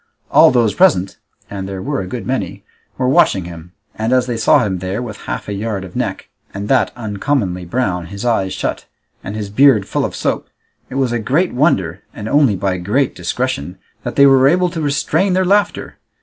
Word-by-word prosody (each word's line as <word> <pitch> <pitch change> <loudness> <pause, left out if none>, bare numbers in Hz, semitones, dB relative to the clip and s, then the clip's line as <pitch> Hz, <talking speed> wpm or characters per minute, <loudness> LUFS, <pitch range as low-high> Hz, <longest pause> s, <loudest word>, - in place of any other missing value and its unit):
All - - +7
those 120 -4 +2
present, 145 - +2 0.3
and 95 -1 -6
there 95 -1 -5
were 140 +5 -2
a 95 - -6
good 120 +5 -6
many, 125 -9 -3 0.3
were 130 - 0
watching 95 -8 +3
him, 85 0 -10 0.2
and 110 +2 -2
as 130 -1 +3
they 120 -2 -3
saw 115 +3 +3
him 95 -3 -2
there 95 +3 -3
with 115 -4 -6
half - - -4
a 105 - -3
yard 100 -1 -3
of 90 -2 -11
neck, - - -3 0.3
and 100 +1 -4
that 135 - +3
uncommonly 105 -4 -2
brown, 90 -4 -2
his 100 +5 -7
eyes 100 -6 +1
shut, - - -3 0.4
and 100 - -6
his 105 -2 -5
beard 125 -3 +4
full - - -1
of - - -3
soap, - - -2 0.4
it - - -8
was 135 -3 +1
a 120 - -1
great 150 - 0
wonder, 100 - +1
and 105 - -6
only 140 -5 +3
by 95 -1 -1
great 110 +10 0
discretion, 95 - -3 0.2
that - - -5
they 140 - +6
were 135 -1 +6
able 180 +3 +2
to 165 -2 -4
restrain 155 +6 +1
their 185 0 +2
laughter. 205 +2 0
110 Hz, 205 wpm, -17 LUFS, 95-135 Hz, 0.4 s, All